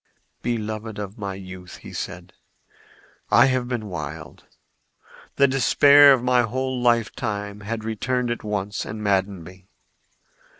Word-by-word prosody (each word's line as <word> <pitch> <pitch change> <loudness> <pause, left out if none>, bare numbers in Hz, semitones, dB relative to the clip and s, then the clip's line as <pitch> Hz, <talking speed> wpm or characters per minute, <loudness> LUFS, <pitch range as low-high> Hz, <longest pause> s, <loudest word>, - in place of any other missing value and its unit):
"Beloved 110 -2 -4
of 105 0 -7
my 100 -2 -4
youth," 95 -1 -10 0.2
said - - -6
he, - - -42 0.6
"I - - +6
have 130 -2 0
been 120 -3 -3
wild. 80 -3 -7 0.9
The 140 - +5
despair 140 +2 +6
of 130 -3 +3
my 125 0 +3
whole 130 +2 -2
lifetime 110 -3 -1
had 110 +2 -5
returned 120 +3 -1
at 120 - -4
once 105 -1 -3
and 110 0 -7
maddened 95 -3 0
me. 90 +2 -14
110 Hz, 130 wpm, -23 LUFS, 100-125 Hz, 0.9 s, I